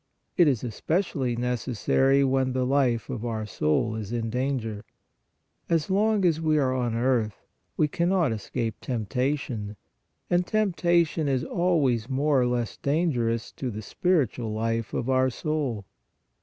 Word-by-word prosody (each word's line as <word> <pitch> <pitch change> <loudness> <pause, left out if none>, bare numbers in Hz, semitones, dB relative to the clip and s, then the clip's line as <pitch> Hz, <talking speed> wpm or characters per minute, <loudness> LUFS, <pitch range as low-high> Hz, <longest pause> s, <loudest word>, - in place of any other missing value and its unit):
It 175 -3 +5
is 130 -5 +1
especially 130 - -1
necessary 125 +3 +1
when 130 -1 +1
the 130 0 0
life 125 -4 +1
of 115 - -5
our 110 -2 -3
soul 105 +4 0
is 110 -1 -5
in 115 -2 -2
danger. 125 -4 -2 0.9
As 165 +1 +1
long 210 0 +2
as 165 -2 +2
we 155 -1 +2
are 130 -3 +2
on 120 -3 -1
earth 115 -3 0 0.3
we 155 - +3
cannot 175 -3 +1
escape 110 +1 -3
temptation, 125 -2 -2 0.5
and 175 0 +2
tempta 175 -5 +2
tion 155 -1 -3
is 130 -2 +1
always 140 -10 +1
more 140 0 +2
or 125 - +2
less 120 -2 -2
dangerous 130 -7 0
to 130 - -4
the 110 -1 -6
spir 175 - +2
itual 115 -1 -6
life 115 0 -1
of 120 - -2
our 130 0 +3
soul. 135 -6 -2
130 Hz, 150 wpm, -26 LUFS, 115-155 Hz, 0.9 s, It